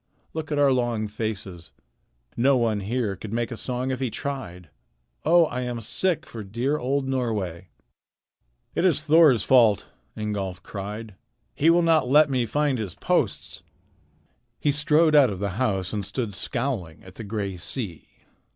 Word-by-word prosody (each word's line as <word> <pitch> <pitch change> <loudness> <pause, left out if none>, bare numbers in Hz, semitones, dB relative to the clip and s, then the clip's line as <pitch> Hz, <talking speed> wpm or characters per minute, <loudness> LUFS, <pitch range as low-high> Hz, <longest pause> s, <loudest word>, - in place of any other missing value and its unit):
Look 155 -1 -5
at 150 - 0
our 140 -1 +4
long 120 -4 0
faces. 105 -5 -5 0.6
No 130 +3 +3
one 115 -3 +1
here 105 0 -2
could 105 +1 -8
make 120 +1 -2
a - - -3
song 125 +3 -3
if 130 - -3
he 130 -2 -1
tried. 90 - -6 0.5
Oh! 170 0 +5
I 125 -4 -4
am 125 -1 -3
sick 170 - -1
for 110 -2 -8
dear 120 +9 -1
old 135 +2 -1
Norway." 105 -10 -2 1.1
"It - - 0
is 165 -5 +3
Thor's 155 - +5
fault," 115 -6 +4 0.3
Ingolf 100 -4 -4
cried. 105 +2 -6 0.4
"He 160 - +3
will 170 +1 +5
not 160 -6 +3
let 150 +1 +5
me 125 -3 +1
find 145 0 0
his 100 -5 -5
posts." - - -1 1.0
He 145 - +2
strode 150 +2 +3
out 145 -4 +6
of 100 - -4
the 100 +1 -2
house 95 -7 0
and 105 -1 -2
stood 105 +2 -4
scowling 115 - -3
at 95 - -13
the 115 - -8
gray 100 -2 -3
sea. 90 - -6
120 Hz, 160 wpm, -25 LUFS, 105-140 Hz, 1.1 s, out